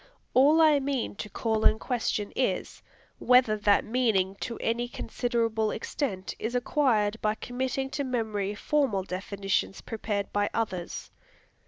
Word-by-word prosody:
All 290 Hz, +5 st, +6 dB
I 305 Hz, -2 st, +6 dB
mean 275 Hz, -2 st, -2 dB
to 210 Hz, -, -5 dB
call 220 Hz, +1 st, -1 dB
in 215 Hz, -, +5 dB
question 225 Hz, -4 st, -2 dB
is, 225 Hz, -8 st, -1 dB, 0.4 s
whether 250 Hz, -3 st, +5 dB
that 205 Hz, -1 st, +3 dB
meaning 220 Hz, -6 st, +1 dB
to 235 Hz, -, -4 dB
any 235 Hz, +2 st, -1 dB
considerable 230 Hz, -3 st, -1 dB
extent 210 Hz, -4 st, -3 dB
is 235 Hz, +3 st, -3 dB
acquired 230 Hz, -5 st, +1 dB
by 215 Hz, 0 st, +1 dB
committing 260 Hz, +3 st, -3 dB
to 285 Hz, -, -2 dB
memory 215 Hz, -6 st, -2 dB
formal 260 Hz, -5 st, +1 dB
definitions 195 Hz, +1 st, -2 dB
prepared 205 Hz, -2 st, -3 dB
by 205 Hz, 0 st, +1 dB
others. 185 Hz, -6 st, -3 dB
225 Hz, 135 wpm, -28 LUFS, 205-255 Hz, 0.4 s, All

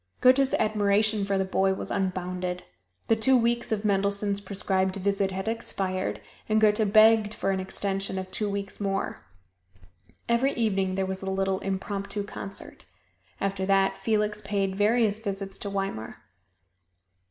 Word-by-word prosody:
Goethe's 260 Hz, +1 st, +5 dB
admiration 210 Hz, 0 st, +2 dB
for 200 Hz, -1 st, 0 dB
the 190 Hz, -, +1 dB
boy 190 Hz, 0 st, +1 dB
was -, -, -6 dB
unbounded. 180 Hz, -1 st, -2 dB, 0.4 s
The 225 Hz, -, +4 dB
two 255 Hz, +4 st, +4 dB
weeks 235 Hz, 0 st, 0 dB
of 215 Hz, -1 st, -1 dB
Mendelssohn's 200 Hz, 0 st, +1 dB
prescribed 190 Hz, -1 st, 0 dB
visit 200 Hz, 0 st, 0 dB
had 190 Hz, +1 st, -5 dB
expired 195 Hz, -4 st, -2 dB, 0.3 s
and 215 Hz, 0 st, +3 dB
Goethe 210 Hz, -1 st, +3 dB
begged 215 Hz, 0 st, +5 dB
for 195 Hz, -, 0 dB
an 190 Hz, -, 0 dB
extension 195 Hz, 0 st, -3 dB
of 185 Hz, 0 st, -5 dB
two 210 Hz, +2 st, -1 dB
weeks 200 Hz, 0 st, -4 dB
more. 195 Hz, -1 st, -2 dB, 1.1 s
Every 245 Hz, +4 st, +2 dB
evening 195 Hz, -5 st, 0 dB
there 190 Hz, 0 st, 0 dB
was 190 Hz, 0 st, -4 dB
the 190 Hz, -, -4 dB
little 190 Hz, 0 st, 0 dB
impromptu 195 Hz, +1 st, -3 dB
concert. 195 Hz, -1 st, -7 dB, 0.5 s
After 195 Hz, -1 st, -1 dB
that 195 Hz, -1 st, +3 dB
Felix 210 Hz, -1 st, 0 dB
paid 195 Hz, -2 st, -1 dB
various 215 Hz, +1 st, +2 dB
visits 195 Hz, -2 st, -5 dB
to 200 Hz, -, -4 dB
Weimar. 195 Hz, -, -4 dB
200 Hz, 145 wpm, -27 LUFS, 190-215 Hz, 1.1 s, Goethe's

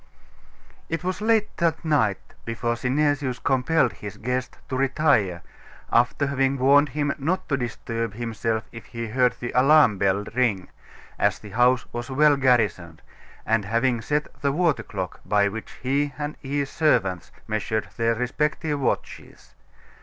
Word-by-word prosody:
It 165 Hz, +1 st, -3 dB
was 185 Hz, +2 st, -3 dB
late 220 Hz, -1 st, +1 dB
that 165 Hz, 0 st, 0 dB
night 115 Hz, -11 st, +2 dB, 0.3 s
before 120 Hz, +1 st, -2 dB
Synesius 140 Hz, +1 st, 0 dB
compelled 135 Hz, 0 st, +1 dB
his 105 Hz, -2 st, -9 dB
guest 125 Hz, +2 st, -3 dB
to 130 Hz, -, -4 dB
retire, 130 Hz, -, +1 dB, 0.5 s
after 125 Hz, +4 st, +2 dB
having 135 Hz, -1 st, 0 dB
warned 140 Hz, +3 st, +5 dB
him 145 Hz, +1 st, -1 dB
not 170 Hz, +7 st, -1 dB
to 140 Hz, -, +2 dB
disturb 115 Hz, -3 st, -4 dB
himself 115 Hz, -1 st, -2 dB
if 115 Hz, -2 st, -10 dB
he 115 Hz, -1 st, -6 dB
heard 125 Hz, +2 st, +2 dB
the 120 Hz, -, -4 dB
alarm 130 Hz, -5 st, +5 dB
bell 100 Hz, +1 st, +1 dB
ring, 110 Hz, -7 st, 0 dB, 0.5 s
as -, -, +2 dB
the 105 Hz, -, -12 dB
house 125 Hz, +3 st, +3 dB
was 120 Hz, +2 st, -5 dB
well 145 Hz, +2 st, +4 dB
garrisoned, 105 Hz, -, +1 dB, 0.4 s
and 110 Hz, -1 st, +1 dB
having 115 Hz, +3 st, +1 dB
set 150 Hz, +5 st, -1 dB
the 140 Hz, -, +1 dB
water 165 Hz, 0 st, +1 dB
clock 95 Hz, -3 st, -6 dB
by 100 Hz, -1 st, +2 dB
which 110 Hz, +2 st, -6 dB
he 140 Hz, +2 st, 0 dB
and 150 Hz, 0 st, -4 dB
his 140 Hz, 0 st, -2 dB
servants 95 Hz, -, +1 dB, 0.2 s
measured 110 Hz, 0 st, -2 dB
their 115 Hz, 0 st, +1 dB
respective 150 Hz, +5 st, -1 dB
watches. 135 Hz, -, -4 dB
125 Hz, 145 wpm, -24 LUFS, 115-145 Hz, 0.5 s, warned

